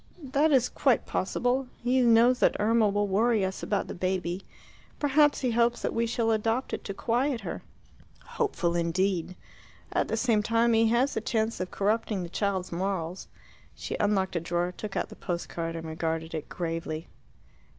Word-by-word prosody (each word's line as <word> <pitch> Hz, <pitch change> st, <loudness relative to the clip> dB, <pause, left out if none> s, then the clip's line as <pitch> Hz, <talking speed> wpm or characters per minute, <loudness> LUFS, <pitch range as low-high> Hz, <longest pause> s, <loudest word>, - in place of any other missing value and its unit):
"That 305 Hz, +3 st, +4 dB
is 255 Hz, -3 st, +4 dB
quite 265 Hz, -4 st, +1 dB
possible. 245 Hz, +7 st, 0 dB, 0.2 s
He 255 Hz, +1 st, +3 dB
knows 240 Hz, +1 st, +5 dB
that -, -, +3 dB
Irma 220 Hz, 0 st, +3 dB
will 205 Hz, +1 st, 0 dB
worry 215 Hz, +1 st, +2 dB
us 190 Hz, 0 st, -4 dB
about 200 Hz, -2 st, -1 dB
the -, -, -5 dB
baby. 185 Hz, 0 st, -2 dB, 0.6 s
Perhaps 290 Hz, 0 st, +3 dB
he 255 Hz, -3 st, +1 dB
hopes 235 Hz, +1 st, +2 dB
that -, -, -1 dB
we 230 Hz, 0 st, +1 dB
shall 230 Hz, -1 st, 0 dB
adopt 225 Hz, +4 st, 0 dB
it -, -, -3 dB
to 200 Hz, -, -4 dB
quiet 245 Hz, +3 st, 0 dB
her." -, -, -5 dB, 0.6 s
"Hopeful 180 Hz, -, -1 dB
indeed." 175 Hz, +1 st, 0 dB, 0.6 s
"At -, -, +1 dB
the 225 Hz, -, -1 dB
same 225 Hz, -2 st, +2 dB
time 230 Hz, +2 st, +2 dB
he 225 Hz, 0 st, +4 dB
has 240 Hz, +5 st, +2 dB
the -, -, -2 dB
chance 225 Hz, -1 st, -1 dB
of 185 Hz, 0 st, -3 dB
corrupting 210 Hz, -1 st, 0 dB
the 170 Hz, -, -6 dB
child's 190 Hz, -1 st, -1 dB
morals." 180 Hz, -1 st, -3 dB, 0.5 s
She -, -, -5 dB
unlocked 195 Hz, -3 st, +1 dB
a -, -, +2 dB
drawer, 175 Hz, +2 st, -1 dB
took 210 Hz, -2 st, -6 dB
out -, -, -1 dB
the -, -, -11 dB
post 175 Hz, -2 st, -4 dB
card, 165 Hz, -1 st, -4 dB
and 165 Hz, 0 st, -6 dB
regarded 160 Hz, 0 st, -3 dB
it 155 Hz, -2 st, -5 dB
gravely. 165 Hz, -2 st, -4 dB
210 Hz, 180 wpm, -28 LUFS, 180-235 Hz, 0.6 s, knows